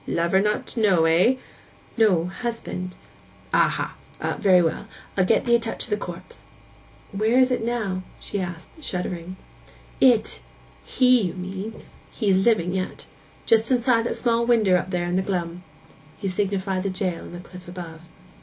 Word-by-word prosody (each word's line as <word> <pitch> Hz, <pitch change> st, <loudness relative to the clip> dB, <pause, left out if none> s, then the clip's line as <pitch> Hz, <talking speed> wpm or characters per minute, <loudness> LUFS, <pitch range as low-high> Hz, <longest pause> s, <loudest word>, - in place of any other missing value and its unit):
'Lover 170 Hz, +3 st, +2 dB
not 210 Hz, +1 st, 0 dB
to -, -, -5 dB
know, 190 Hz, -7 st, +4 dB
eh?' 175 Hz, +10 st, +4 dB, 0.6 s
'No—husband.' 190 Hz, -1 st, 0 dB, 0.6 s
'Aha! -, -, +2 dB, 0.4 s
Very 185 Hz, -3 st, +5 dB
well. 165 Hz, -, -2 dB, 0.3 s
I'll 185 Hz, -, +3 dB
get 190 Hz, -, +2 dB
ee' 235 Hz, -, +4 dB
a 235 Hz, -, +6 dB
touch 230 Hz, 0 st, -3 dB
of 230 Hz, -, -9 dB
the -, -, +3 dB
corpse.' 175 Hz, -4 st, -9 dB, 0.6 s
'Where 220 Hz, +4 st, +1 dB
is 260 Hz, 0 st, +5 dB
it 245 Hz, -, 0 dB
now?' 220 Hz, -6 st, -1 dB, 0.2 s
she 200 Hz, -, -4 dB
said, 175 Hz, -, -7 dB
shuddering. 180 Hz, 0 st, -4 dB, 0.7 s
'It?_—he_, -, -, +2 dB
you 175 Hz, -, -2 dB
mean; 190 Hz, +4 st, -6 dB, 0.3 s
he's 195 Hz, -5 st, +1 dB
living 190 Hz, -4 st, +2 dB
yet. 185 Hz, -1 st, -3 dB, 0.4 s
Just 225 Hz, 0 st, +3 dB
inside 245 Hz, -2 st, +3 dB
that -, -, 0 dB
little -, -, -5 dB
small 235 Hz, -1 st, +2 dB
winder 220 Hz, -6 st, +4 dB
up 180 Hz, +1 st, 0 dB
there 175 Hz, -2 st, -1 dB
in 175 Hz, +1 st, 0 dB
the -, -, +2 dB
glum.' 180 Hz, -2 st, -3 dB, 0.6 s
He 200 Hz, -, -4 dB
signified 190 Hz, 0 st, -1 dB
the 195 Hz, -, -1 dB
jail 185 Hz, -2 st, -2 dB
on -, -, -10 dB
the 175 Hz, -, -7 dB
cliff 180 Hz, 0 st, -12 dB
above. 170 Hz, -3 st, -8 dB
190 Hz, 160 wpm, -24 LUFS, 180-225 Hz, 0.7 s, a